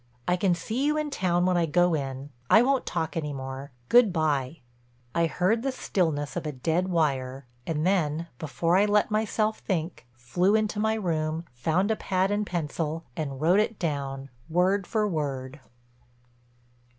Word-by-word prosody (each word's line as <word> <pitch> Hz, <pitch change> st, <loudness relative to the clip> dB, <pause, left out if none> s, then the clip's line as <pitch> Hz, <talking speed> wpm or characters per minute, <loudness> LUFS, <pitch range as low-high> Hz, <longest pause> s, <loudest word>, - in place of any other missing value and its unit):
I 180 Hz, -, +3 dB
can 180 Hz, -1 st, +2 dB
see 225 Hz, +9 st, -3 dB
you 300 Hz, 0 st, +2 dB
in 305 Hz, -1 st, -2 dB
town 175 Hz, -7 st, +1 dB
when 185 Hz, -1 st, +2 dB
I 170 Hz, -1 st, +2 dB
go 175 Hz, +2 st, +3 dB
in. 135 Hz, -1 st, -4 dB, 0.2 s
I 220 Hz, -, +7 dB
won't 270 Hz, 0 st, +1 dB
talk 160 Hz, -1 st, -2 dB
any 150 Hz, -3 st, -2 dB
more. 135 Hz, +1 st, -6 dB, 0.2 s
Good 240 Hz, -4 st, +6 dB
by." 155 Hz, -3 st, -1 dB, 0.5 s
I 170 Hz, 0 st, +2 dB
heard 185 Hz, +8 st, +1 dB
the 270 Hz, +2 st, -1 dB
stillness 160 Hz, -, -1 dB
of 170 Hz, -3 st, -3 dB
a -, -, -2 dB
dead 160 Hz, +7 st, 0 dB
wire 135 Hz, -6 st, 0 dB, 0.2 s
and 155 Hz, -1 st, -1 dB
then 165 Hz, -4 st, +1 dB
before 165 Hz, +4 st, +1 dB
I 200 Hz, -, +5 dB
let 210 Hz, +1 st, +2 dB
myself 215 Hz, 0 st, 0 dB
think, 165 Hz, -, -3 dB
flew 175 Hz, -, +1 dB
into 215 Hz, -1 st, 0 dB
my 220 Hz, +1 st, +2 dB
room, 165 Hz, -5 st, -1 dB
found 165 Hz, -, +1 dB
a -, -, +2 dB
pad 190 Hz, -1 st, 0 dB
and 205 Hz, 0 st, 0 dB
pencil 160 Hz, -1 st, -3 dB
and 140 Hz, -4 st, -4 dB
wrote 175 Hz, +6 st, +4 dB
it 215 Hz, 0 st, 0 dB
down 140 Hz, -4 st, -3 dB, 0.2 s
word 185 Hz, +3 st, +2 dB
for 215 Hz, -2 st, +1 dB
word. 140 Hz, -5 st, -3 dB
170 Hz, 170 wpm, -27 LUFS, 150-200 Hz, 0.5 s, I